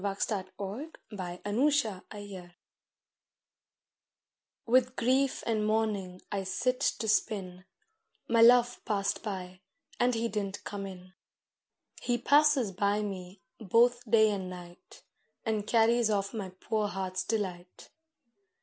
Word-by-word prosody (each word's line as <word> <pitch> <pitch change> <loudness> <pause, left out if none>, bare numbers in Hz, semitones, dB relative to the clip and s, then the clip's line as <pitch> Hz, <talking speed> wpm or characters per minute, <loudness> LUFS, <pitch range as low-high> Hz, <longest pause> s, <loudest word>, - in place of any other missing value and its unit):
THE 200 0 -1
GIRL'S 210 +1 -7 0.3
LAMENTATION 205 -7 -1 2.1
With 250 +1 +3
grief 260 +3 +1
and 220 -2 0
mourning 210 -4 -1
I 195 -1 -1
sit 250 +7 -1
to 220 - 0
spin; 190 -4 -1 0.6
My 230 0 +3
Love 240 +1 +6
passed 200 -2 -1
by, 185 -3 -6 0.4
and 245 0 +3
he 230 +1 0
didn't 200 -3 -4
come 200 -1 -5
in; 185 -1 -11 0.9
He 240 -1 0
passes 285 -3 +4
by 200 +2 0
me, 185 -2 -7 0.2
both 240 +4 +3
day 220 -1 +5
and 190 -3 -3
night, 175 -1 -12 0.4
And 215 -2 -1
carries 230 0 +3
off 200 0 0
my 205 -4 -4
poor 210 +3 -2
heart's 185 -1 -3
delight. 185 -4 -4
210 Hz, 115 wpm, -30 LUFS, 190-235 Hz, 2.1 s, Love